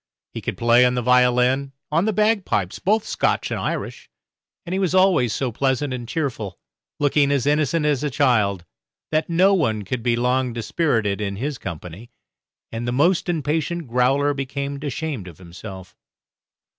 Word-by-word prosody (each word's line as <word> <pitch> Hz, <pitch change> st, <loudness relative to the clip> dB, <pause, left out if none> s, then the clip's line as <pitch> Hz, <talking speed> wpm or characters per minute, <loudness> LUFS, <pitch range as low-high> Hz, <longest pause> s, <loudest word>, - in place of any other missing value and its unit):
He -, -, -5 dB
could -, -, -4 dB
play 120 Hz, +1 st, +5 dB
on 125 Hz, 0 st, +3 dB
the 125 Hz, -, -1 dB
violin, 125 Hz, +2 st, +3 dB, 0.2 s
on 165 Hz, +5 st, +2 dB
the 220 Hz, -, +2 dB
bagpipes 200 Hz, -, 0 dB
both 215 Hz, +3 st, +1 dB
Scotch -, -, 0 dB
and -, -, -2 dB
Irish -, -, -4 dB, 0.6 s
and 175 Hz, -, -5 dB
he 190 Hz, -, 0 dB
was 185 Hz, -2 st, 0 dB
always 185 Hz, -, +4 dB
so 130 Hz, +1 st, -2 dB
pleasant 135 Hz, +3 st, 0 dB
and 120 Hz, -2 st, -6 dB
cheerful, 115 Hz, -, -3 dB, 0.4 s
looking 145 Hz, 0 st, +2 dB
as 140 Hz, -4 st, +1 dB
innocent 150 Hz, +1 st, +1 dB
as 145 Hz, -2 st, +1 dB
a 150 Hz, -, 0 dB
child, 110 Hz, -, +1 dB, 0.5 s
that 155 Hz, +2 st, 0 dB
no 185 Hz, +4 st, +4 dB
one 115 Hz, -, +1 dB
could 115 Hz, +5 st, -3 dB
be 120 Hz, 0 st, +1 dB
long 125 Hz, +1 st, 0 dB
dispirited 115 Hz, -4 st, 0 dB
in 100 Hz, -1 st, -2 dB
his 135 Hz, +5 st, -4 dB
company, 90 Hz, +5 st, -8 dB, 0.6 s
and 115 Hz, +1 st, -4 dB
the -, -, 0 dB
most 170 Hz, +8 st, +2 dB
impatient 160 Hz, +1 st, -1 dB
growler 135 Hz, +4 st, +2 dB
became 140 Hz, +1 st, -4 dB
ashamed 145 Hz, -7 st, -4 dB
of 85 Hz, -4 st, -11 dB
himself. 95 Hz, +1 st, -10 dB
130 Hz, 165 wpm, -22 LUFS, 115-155 Hz, 0.6 s, play